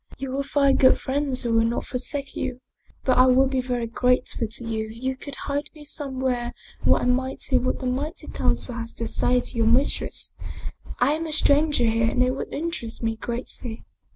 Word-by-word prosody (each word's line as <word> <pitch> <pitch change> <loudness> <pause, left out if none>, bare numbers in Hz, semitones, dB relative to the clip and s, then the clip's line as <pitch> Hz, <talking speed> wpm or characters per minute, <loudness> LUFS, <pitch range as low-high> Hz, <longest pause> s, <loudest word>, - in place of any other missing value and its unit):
" - - -15
You 270 -1 -4
will 275 +1 0
find 280 -1 +3
good 260 - +6
friends 270 -1 -1
who 235 -1 0
will 225 0 +5
not 230 +1 -1
forsake 275 +2 -2
you. 255 -1 -3 0.4
But 255 -1 +3
I 255 - +7
will 255 +1 +5
be 265 -1 0
very 245 -2 -2
grateful 250 0 +1
to 230 +3 -2
you 220 -1 -2
if 220 - -10
you 260 +3 -2
could 275 +1 -8
hide 285 +1 -3
me 300 - -11
somewhere 260 -4 -1 0.3
where - - +4
I - - 0
might 260 +1 0
hear 255 -2 +2
what 255 - -1
the - - -4
Mighty 285 +7 -2
Council 250 - 0
has 230 -1 -5
to 230 - -3
say 250 +2 +2
to - - -7
your 225 -1 +2
mistress. 250 +5 +1 0.6
I 255 +4 +3
am 325 +1 -2
a - - -5
stranger 295 -2 +3
here 225 0 +2
and 250 - +2
it 255 - +2
would 265 - -5
interest 290 -9 -4
me 225 0 0
greatly." 235 0 -4
255 Hz, 210 wpm, -25 LUFS, 240-275 Hz, 0.6 s, I